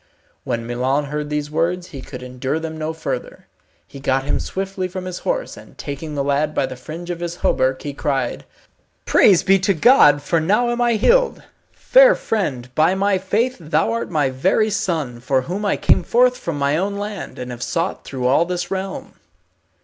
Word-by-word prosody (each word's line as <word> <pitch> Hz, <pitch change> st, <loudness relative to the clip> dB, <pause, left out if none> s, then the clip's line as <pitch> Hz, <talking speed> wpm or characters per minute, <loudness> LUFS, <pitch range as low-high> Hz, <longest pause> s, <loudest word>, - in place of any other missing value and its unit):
When 115 Hz, 0 st, -3 dB
Milon 130 Hz, +4 st, 0 dB
heard 150 Hz, +1 st, -4 dB
these 150 Hz, 0 st, -3 dB
words 175 Hz, +3 st, -1 dB
he 140 Hz, -6 st, -8 dB
could 125 Hz, -, -9 dB
endure 130 Hz, +3 st, -3 dB
them 160 Hz, 0 st, -5 dB
no 155 Hz, 0 st, -3 dB
further. -, -, -5 dB, 0.4 s
He 140 Hz, -, -12 dB
got 135 Hz, -1 st, 0 dB
him 145 Hz, -, -1 dB
swiftly 195 Hz, -1 st, -3 dB
from 185 Hz, 0 st, -6 dB
his 180 Hz, -1 st, -5 dB
horse, -, -, -2 dB
and -, -, -15 dB
taking 150 Hz, +2 st, -6 dB
the 140 Hz, -, 0 dB
lad 145 Hz, +2 st, 0 dB
by -, -, +2 dB
the 130 Hz, -, -7 dB
fringe 165 Hz, +7 st, -7 dB
of 170 Hz, -, -5 dB
his 175 Hz, 0 st, -4 dB
hauberk, 130 Hz, 0 st, +1 dB
he 145 Hz, -, -4 dB
cried, 135 Hz, -3 st, -2 dB, 0.6 s
"Praise 190 Hz, -4 st, +5 dB
be 195 Hz, 0 st, +4 dB
to 190 Hz, +1 st, +1 dB
God, 150 Hz, -, +5 dB
for 165 Hz, +2 st, +1 dB
now 210 Hz, +9 st, +2 dB
am 240 Hz, 0 st, -1 dB
I 240 Hz, -1 st, +3 dB
healed. 485 Hz, -, +2 dB, 0.3 s
Fair -, -, +5 dB
friend, 130 Hz, -, -3 dB
by 160 Hz, +6 st, +3 dB
my 195 Hz, 0 st, +1 dB
faith 220 Hz, +7 st, 0 dB
thou 150 Hz, -9 st, 0 dB
art 115 Hz, -1 st, -2 dB
my 145 Hz, -4 st, +1 dB
very 190 Hz, +11 st, +1 dB
son, 155 Hz, -, -2 dB
for 130 Hz, +2 st, +1 dB
whom 185 Hz, +8 st, -4 dB
I 205 Hz, -, +1 dB
came -, -, +3 dB
forth 245 Hz, +7 st, +3 dB
from 170 Hz, -10 st, -4 dB
my 140 Hz, +1 st, +1 dB
own 200 Hz, +3 st, -1 dB
land, 205 Hz, -1 st, -6 dB
and 125 Hz, 0 st, -6 dB
have 120 Hz, -1 st, -8 dB
sought 165 Hz, +5 st, -2 dB
through 130 Hz, -2 st, -5 dB
all 140 Hz, +6 st, +4 dB
this 175 Hz, 0 st, -4 dB
realm." 190 Hz, 0 st, -4 dB
160 Hz, 195 wpm, -20 LUFS, 140-195 Hz, 0.6 s, Praise